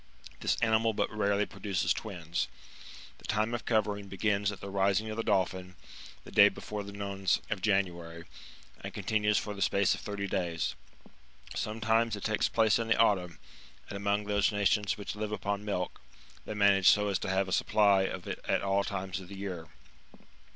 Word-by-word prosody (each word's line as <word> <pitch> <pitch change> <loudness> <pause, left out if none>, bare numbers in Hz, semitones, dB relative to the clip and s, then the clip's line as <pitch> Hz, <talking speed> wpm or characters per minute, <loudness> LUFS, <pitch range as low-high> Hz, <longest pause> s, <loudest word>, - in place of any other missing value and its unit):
This - - 0
animal 110 0 +3
but 105 - -1
rarely 100 0 +2
produces 90 -3 -1
twins. 85 -6 -3 0.7
The - - -13
time 110 +2 0
of 120 - -3
covering 105 -3 0
begins 100 +1 0
at 100 - -9
the 100 - -7
rising 100 +2 +1
of 110 - -5
the - - +1
Dolphin, 95 -3 0 0.5
the - - -12
day 100 0 +7
before 105 0 -6
the 100 0 -8
nones 100 -1 -1
of - - -1
January, 85 -4 -1
^^ - - -22 0.6
and - - -6
continues 105 -1 +1
for 105 - -2
the 100 - -8
space 100 -1 +3
of - - -5
thirty 100 -1 -4
days. 85 -4 -1 0.8
Some 110 +1 -3
times 115 0 +2
it 105 - -8
takes 110 -1 +1
place 110 -2 +3
in 115 - -2
the 115 - +3
autumn; 90 -7 +2 0.5
and - - -5
among 100 +1 0
those 100 -1 +2
nations 105 0 +1
which 100 0 -5
live 105 0 -3
upon 100 -1 -2
milk, 95 -4 -3 0.4
they 105 - -5
manage 100 -2 +5
so 105 0 +4
as 95 - 0
to - - -4
have 95 0 +1
a - - -6
supplj 100 -1 +3
of 90 -1 -6
it - - -4
at - - +1
all 100 0 +2
times 95 -3 -4
of 95 - -10
the 100 +1 -9
year. 90 -4 -5
100 Hz, 190 wpm, -30 LUFS, 95-105 Hz, 0.8 s, day